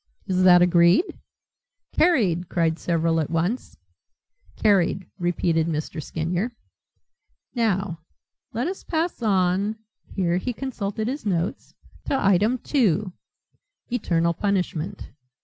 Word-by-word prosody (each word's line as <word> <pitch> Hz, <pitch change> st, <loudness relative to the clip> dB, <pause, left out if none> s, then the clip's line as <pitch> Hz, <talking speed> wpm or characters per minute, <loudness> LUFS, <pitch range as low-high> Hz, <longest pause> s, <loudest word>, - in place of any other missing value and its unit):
Is 185 Hz, -1 st, 0 dB
that 180 Hz, -1 st, +7 dB
agreed?" 175 Hz, -, +3 dB, 0.7 s
"Carried," 195 Hz, -, +2 dB
cried 165 Hz, -2 st, 0 dB
several 165 Hz, -1 st, +1 dB
at 155 Hz, -, -1 dB
once. 175 Hz, +9 st, -2 dB, 0.8 s
"Carried," 195 Hz, -3 st, +2 dB
repeated 170 Hz, -2 st, +1 dB
Mr. 155 Hz, -1 st, -3 dB
Skinyer. 175 Hz, -, -2 dB, 1.0 s
"Now 195 Hz, -7 st, 0 dB, 0.5 s
let 235 Hz, +4 st, -2 dB
us 380 Hz, +2 st, -5 dB
pass 330 Hz, -3 st, -2 dB
on" 195 Hz, 0 st, +1 dB, 0.3 s
here 175 Hz, -3 st, 0 dB
he 245 Hz, +7 st, -2 dB
consulted 220 Hz, -4 st, -4 dB
his 275 Hz, +4 st, -3 dB
notes 180 Hz, -3 st, -2 dB, 0.3 s
"to 275 Hz, -, +1 dB
item 200 Hz, +6 st, +3 dB
two, 210 Hz, -, +1 dB, 0.8 s
eternal 170 Hz, -8 st, +1 dB
punishment. 195 Hz, -1 st, -2 dB
185 Hz, 105 wpm, -24 LUFS, 170-220 Hz, 1.0 s, that